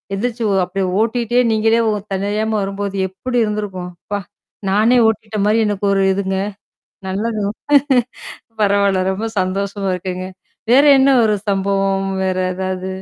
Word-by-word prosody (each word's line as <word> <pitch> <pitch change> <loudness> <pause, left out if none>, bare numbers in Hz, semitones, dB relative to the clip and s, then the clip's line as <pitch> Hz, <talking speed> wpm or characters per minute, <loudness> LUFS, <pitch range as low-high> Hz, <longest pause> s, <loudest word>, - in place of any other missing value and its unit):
எந்துருச்சு 235 +2 -3
ஓ - - +2
அப்டியே 190 +1 -2 0.2
ஓட்டிட்டே 240 +1 0
நீங்களே 225 +1 +2
ஒ - - 0 0.2
தன்னறியாம 210 +3 -1
வரும்போது, 200 0 -4
எப்படி 245 +6 -4
இருந்திருக்கும். 195 -4 -4 0.2
அப்பா! 205 0 -2 0.5
நானே 220 +5 +4
ஓட்டிட்ட 220 -1 -2
மாரி 215 +2 +3
எனக்கு 205 -1 -2
ஒரு 195 0 +2
இதுங்க. 190 -1 -2 0.7
நல்லது. 210 +3 -2 1.2
பரவால்ல 200 -2 +2
ரொம்ப 215 +4 -3
சந்தோஷமா 195 +1 -2
இருக்குங்க. 185 0 -5 0.5
வேற 275 +4 +6
என்னா 270 +1 +5
ஒரு 210 - +2
சம்பவம் 195 0 0 0.2
வேற 185 -1 0 0.2
ஏதாவது? 185 0 -3
200 Hz, 130 wpm, -18 LUFS, 190-220 Hz, 1.2 s, வேற